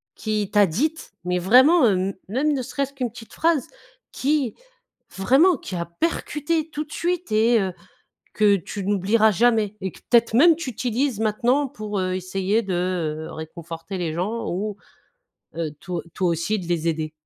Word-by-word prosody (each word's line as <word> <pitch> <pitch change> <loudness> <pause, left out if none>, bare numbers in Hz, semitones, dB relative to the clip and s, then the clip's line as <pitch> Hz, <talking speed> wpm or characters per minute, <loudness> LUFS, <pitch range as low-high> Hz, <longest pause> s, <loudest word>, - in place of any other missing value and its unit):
qui 215 -2 -2
t'a 205 -2 +5
dite, 300 - -2
mais 180 0 0
vraiment, 255 - +6
hem, 190 0 +1 0.2
même 290 +7 +1
ne 270 - -1
serait-ce 275 +2 -3
qu'une 250 -4 -3
petite 225 0 -12
phrase 325 -6 +1 0.5
qui, 280 -3 0 0.6
vraiment, 275 - +4
qui 185 - -7
a 170 -1 -2
percuté 315 - -2
tout 305 -1 -4
de 300 - -21
suite 355 -4 -2
et, 225 +2 +4
heu, 190 -2 -2 0.6
que 210 -1 +4
tu 195 +2 -6
n'oublieras 205 +3 +3
jamais 220 -1 +2
et 190 -1 -3
que - - -15
peut-être 235 -2 +4
même 325 +6 +7
tu 305 -6 -4
utilises 245 +1 -1
maintenant 240 +6 +2
pour, 215 -5 -5
heu, 185 0 -1
essayer 190 +4 0
de, 190 -3 -3 0.5
heu, - - -8
réconforter 165 +3 -7
les 170 -3 -2
gens 210 +7 -2
ou, 205 +3 -3 0.8
heu, 165 -2 -2
to 180 -3 -4
toi 185 - 0
aussi 170 +6 -1
de 175 -2 -7
les 170 -1 -1
aider? 155 -1 -2
215 Hz, 170 wpm, -23 LUFS, 185-265 Hz, 0.8 s, même